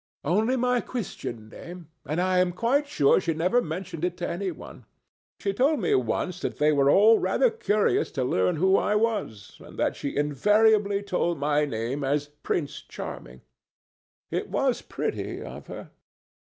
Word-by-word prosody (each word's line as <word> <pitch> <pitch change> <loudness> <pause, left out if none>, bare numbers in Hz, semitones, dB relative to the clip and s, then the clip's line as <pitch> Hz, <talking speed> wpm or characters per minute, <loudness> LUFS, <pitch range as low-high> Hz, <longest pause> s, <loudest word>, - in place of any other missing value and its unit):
"Only 215 - +1
my 250 -1 +1
Christian 120 - -6
name, 175 +8 -10 0.2
and 155 +4 -1
that 180 - +2
I 185 -1 +2
am 180 -1 +2
quite 260 +9 +1
sure 150 - +3
she 165 -3 -1
never 180 +10 +2
mentioned 175 0 -4
to 175 - -3
any 185 +3 -2
one. - - -10 0.5
She 200 - -1
told 275 +7 +2
me 180 - +1
once 145 +8 -1
that - - -4
they 150 +1 +3
were 140 -2 +3
all 215 +8 +6
rather - - +2
curious 215 - +1
to 135 - -1
learn 95 -7 +1
who 190 +4 +3
I 210 - +1
was, 210 - -2
and - - -13
that - - 0
she 140 - -5
invariably 205 - +3
told 180 -3 0
them 140 - -12
my 150 +1 +2
name 125 +2 -3
was 145 +1 -1
Prince 150 -3 -2
Charming. 60 +1 -9 0.9
It - - -2
was - - 0
pretty - - -4
of - - -9
her. - - -9
180 Hz, 170 wpm, -26 LUFS, 145-210 Hz, 0.9 s, all